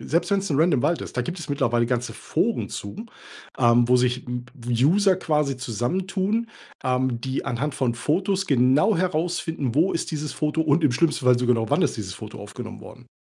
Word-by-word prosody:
Selbst 170 +4 -1
wenn's 195 0 +1
'n 140 - +1
random 160 -7 +3
Wald 170 - +1
ist, - - -9
da 125 - +1
gibt 175 +5 -5
es 155 - -7
mittlerweile 120 -4 +1
ganze 125 0 -2
Foren - - -1
zu, 100 - -7 0.5
ähm, 120 -1 +4
wo 125 - +5
sich 125 0 0 0.3
w 120 -1 -1
User 190 +3 +4
quasi 150 -6 0
zusammentun, 185 - -1 0.4
ähm, 125 -2 0
die 130 +1 -3
anhand 135 +4 -2
von 120 -3 0
Fotos 185 - 0
genau 135 - +3
herausfinden, 165 -6 -1
wo 170 +6 +3
ist 165 - -2
dieses 150 -1 -3
Foto, 155 +1 -1
und 155 +1 +2
im 130 - +4
schlimmsten 155 0 +1
Fall 125 -1 +6
sogar 125 0 +3
noch 115 -1 -2
wann - - +3
ist - - +1
dieses 95 -3 -5
Foto 110 -1 -9
aufgenommen 110 +3 -8
worden. 125 -1 -13
140 Hz, 195 wpm, -24 LUFS, 120-170 Hz, 0.5 s, Fall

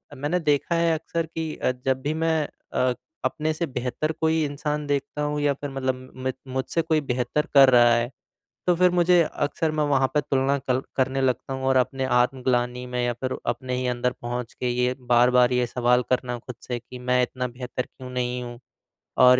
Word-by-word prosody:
मैंने 150 +7 -1
देखा 150 +2 +1
है 165 -1 +3
अक्सर 165 +1 -2
कि 160 -1 -5
अ, - - 0
जब 130 0 +1
भी 150 +3 -1
मैं 160 0 +1 0.3
अ, 125 -1 +2 0.3
अपने 155 +1 0
से 170 +2 -2
बेहतर 130 +3 -2
कोई 160 0 +2
इंसान 150 +1 -3
देखता 145 +1 -2
हूँ 150 0 -1
या 145 -1 +3
फिर 145 +1 -6
मतलब 130 -1 -3 0.2
म 130 - +1 0.2
मुझसे 130 +5 0
कोई 155 -1 +1
बेहतर 125 +3 -1
कर 135 -1 +8
रहा 120 -2 +6
है, 120 +1 0 0.6
तो 180 - +4
फिर 180 0 +5
मुझे 175 0 +4
अक्सर 155 +1 -1
मैं 155 -1 +1
वहाँ 135 -2 +3
पे 150 - +4
तुलना 135 0 +1
कर 130 -1 0 0.2
करने 135 0 +1
लगता 130 0 0
हूँ 130 - -4
और 130 0 +3
अपने 130 +1 +1
आत्मगलानी 125 -1 +1
में 125 0 -2
या 120 - +1
फिर 130 +2 -3
अपने 125 +2 -2
ही 130 - -1
अंदर 125 0 0
पहुँच 120 0 -4
के 125 - -2
ये 125 +1 +1 0.2
बार-बार 125 +1 +5
ये 125 0 +2
सवाल 125 +1 +2
करना 125 -1 0
खुद 125 +1 -9
से 125 - -1
कि 125 +1 -11
मैं 125 0 +2
इतना 125 0 -2
बेहतर 125 +1 -4
क्यों 130 0 -12
नहीं 125 0 -2
हूँ। 120 -1 -7 0.7
और 125 0 +8
130 Hz, 200 wpm, -25 LUFS, 125-150 Hz, 0.7 s, कर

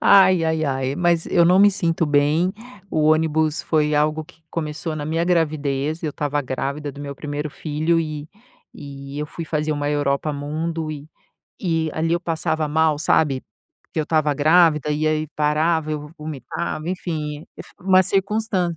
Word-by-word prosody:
ai-ai-ai, 160 -8 +4
mas 170 0 +1
eu 170 - +4
não 180 +2 +5
me 205 +1 +7
sinto 165 -4 0
bem, 150 +5 +2 0.4
o 155 - +1
ônibus 155 0 +2
foi 150 -1 +1
algo 155 +1 +1
que 160 +1 -21
começou 155 0 -3
na 150 -1 -4
minha 165 +2 0
gravidez, 155 -3 0
eu 155 - -1
estava 145 0 -1
grávida 140 +2 -3
do 140 - -10
meu 140 -1 -6
primeiro 150 +1 -4
filho 155 +3 0
e 155 -1 -5 0.4
e 140 0 -9
eu 150 - -2
fui 165 - -7
fazer 155 -1 -1
uma 145 0 -1
Europa 145 +1 0
Mundo 155 +2 -3
e 145 0 -9 0.5
e 165 -3 0
ali 165 +1 0
eu 175 - -1
passava 160 -2 -1
mal, 155 -1 +2
sabe, 140 -4 +2 0.4
porque - - -7
eu 155 - -1
estava 155 -2 +2
grávida 155 0 +4
e 150 +1 0
aí 155 0 +1
parava, 155 +1 +1
eu 150 0 -5
vomitava, 155 +2 -5
enfim, 155 -4 -4 0.4
uma 185 0 +5
circunstância 195 -3 0
155 Hz, 160 wpm, -22 LUFS, 150-165 Hz, 0.5 s, me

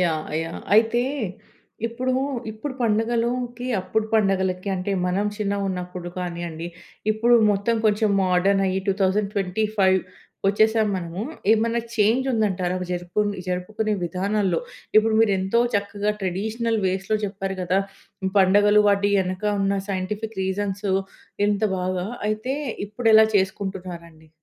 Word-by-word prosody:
Yeah! 160 -3 0
Yeah! 165 0 -6
అయితే 225 +2 +4 0.8
ఇప్పుడూ 250 +2 -2 0.4
ఇప్పుడు 255 +6 -6
పండగలుకి 235 +2 0
అప్పుడు 215 +4 -1
పండగలకి 190 -2 +1
అంటే 185 +2 -2
మనం 195 +3 0
చిన్నగున్నప్పుడు 185 -4 -3
కానివ్వండి 170 -2 -4 0.4
ఇప్పుడు 230 +3 +3 0.2
మొత్తం 205 +3 +1
కొంచెం 210 0 +2
మోడర్న్ 190 +2 +2
అయ్యి 190 0 0
2025 195 0 +1 0.5
వచ్చేసాము 220 +2 +3
మనము. 175 0 -5 0.3
ఏమైనా 230 +1 +1
చేంజ్ 225 +4 +3
ఉందంటారా 190 -5 0 0.2
జరుపు 175 +2 -2 0.3
జరుపుకునే 210 +4 -2
విధానాల్లో. 195 - 0 0.4
ఇప్పుడు 220 +1 +5
మీరు 225 -3 +4
ఎంతో 190 +5 +1
చక్కగా 205 +1 0
ట్రెడిషనల్ 220 +5 -1
వేస్‌లో 190 +3 0
చెప్పారు 195 -1 -4
కదా! 180 +2 +1 0.6
పండగలు 205 +2 +5
వాటెనక 200 -2 +1 0.2
ఉన్న 195 0 +1
సైంటిఫిక్ 205 +3 -3
రీజన్సు 195 +1 -2 0.6
ఎంత 205 +1 0 0.2
బాగా, 185 0 -2 0.2
అయితే 215 +5 -1 0.3
ఇప్పుడు 225 +2 0
ఎలా 220 0 +9
చేసుకుంటున్నారండి? 180 -4 -4
200 Hz, 110 wpm, -23 LUFS, 185-220 Hz, 0.8 s, ఎలా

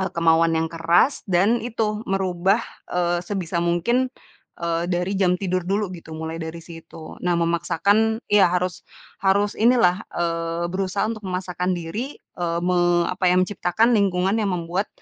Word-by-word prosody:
eee, 190 - 0
kemauan 165 0 +4
yang 160 - +1
keras, 170 - +2
dan 195 +6 +3
itu 220 -2 -2
merubah, 190 -1 +1 0.3
eee, 175 -1 0
sebisa 175 -2 -3
mungkin, 175 +10 +1 0.5
eee, 170 0 -1
dari 180 +2 -1
jam 180 -1 +3
tidur 185 -1 -1
dulu 200 -1 0
gitu, 160 -3 -9
mulai 160 +1 -5
dari 160 +1 -6
situ. 165 -2 -11
Nah, 175 -1 +1
memaksakan 200 +7 +1
iya, 200 -3 +6
harus 180 0 -1 0.4
harus 200 +1 +2
inilah, 225 -6 +4 0.2
eee, 165 0 -1
berusaha 195 +1 -1
untuk 215 -1 -4
memaksakan 180 0 -2
diri, 205 - -5
eee, 170 -1 -4
me 175 -1 +2
apa 185 0 +1
ya, 180 - +3
menciptakan 205 +4 +1
lingkungan 195 -1 +2
yang 205 - 0
membuat, 175 +4 -2
180 Hz, 150 wpm, -23 LUFS, 170-200 Hz, 0.5 s, iya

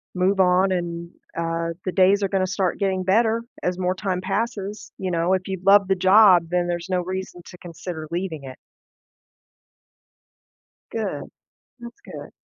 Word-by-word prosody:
move 190 +2 +1
on 185 +1 +4
and, 170 -1 -3 0.3
uh, 165 0 -1 0.2
the 185 - -1
days 195 +2 +4
are 195 - 0
gonna 190 -1 0
start 190 -1 -1
getting 190 -2 0
better, 225 +4 +2 0.2
as 180 0 -1
more 180 0 0
time 185 -1 -3
passes, 205 +1 -3
you 185 -1 -3
know, 170 +2 +1
if 190 0 -1
you 190 -2 -4
love 200 -1 +6
the 190 - +2
job 185 -1 +6
then 175 0 0
there's 175 +1 -3
no 180 -1 +1
reason 185 0 -5
to 180 - -12
consider 165 -2 -7
leaving 170 -5 -3
it. 130 -1 -9 2.4
Good. - - -3 0.6
That's 235 0 -11
good. - - -9
185 Hz, 160 wpm, -23 LUFS, 175-195 Hz, 2.4 s, love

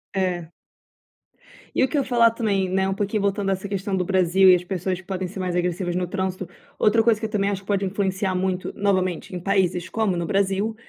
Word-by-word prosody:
É. 175 -3 -1 1.2
E - - +3
o - - +4
que 295 - -2
eu - - +3
ia - - -11
falar 235 -2 +5
também, 200 -5 0
né, 190 +1 +1
um 195 - 0
pouquinho 205 +1 -1
voltando 200 0 0
a - - +3
essa 190 +1 -5
questão 195 0 -2
do 180 - 0
Brasil 190 0 +3
e - - +9
as 180 - -2
pessoas 185 0 -3
que 180 - -28
podem 190 -1 -3
ser 190 +2 -8
mais 180 -1 -2
agressivas 175 0 -1
no 180 0 0
trânsito. 190 -1 -3 0.3
Outra 225 +2 +4
coisa 225 -1 +3
que 225 - -3
eu 220 - -3
também 200 -2 +1
acho 195 -1 -3
que 195 - -23
pode 200 -1 0
influenciar 190 -1 -1
muito, 185 0 -1
novamente 185 -2 -1
em - - -3
países 185 -1 0
como 215 -1 0
no 170 -1 -2
Brasil, 200 +2 0
190 Hz, 235 wpm, -23 LUFS, 185-200 Hz, 1.2 s, e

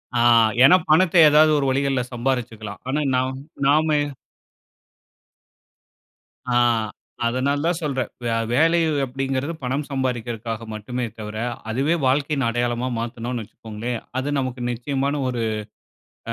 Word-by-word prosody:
ஆ - - +2 0.4
ஏன்னா, 140 +7 +8
பணத்த 165 +3 +4
எதாவது 155 +1 +6
ஒரு 140 - 0
வழிகள்ல 135 -1 +1
சம்பாரிச்சுக்கலாம். 115 -5 -3
ஆனா 135 +3 0 0.2
நான் 130 +1 -1 0.3
நாம 150 +3 +4 2.7
ஆ, - - +2 0.7
அதனால 140 +4 0
தான் 170 -1 0
சொல்றேன். 135 -5 -2
வே 120 - -1 0.2
வேலை 165 +6 +4 0.3
அப்பிடிங்கிறது, 135 +3 -2
பணம் 135 +4 -1
சம்பாரிக்கிறக்காக 120 -4 -3
மட்டுமே 120 +4 -4
தவிர, 105 0 -6 0.3
அதுவே 135 +8 +1
வாழ்க்கையின் 140 0 +1
அடையாளமா 120 +1 -1
மாத்துனோன்னு 120 +1 -4
வச்சுக்கோங்களேன். 115 +2 -6 0.2
அது 145 +2 -2
நமக்கு 130 -2 -3
நிச்சயமான 140 +4 -2
ஒரு, 120 -2 -2 0.9
அ - - -1
130 Hz, 115 wpm, -22 LUFS, 120-140 Hz, 2.7 s, ஏன்னா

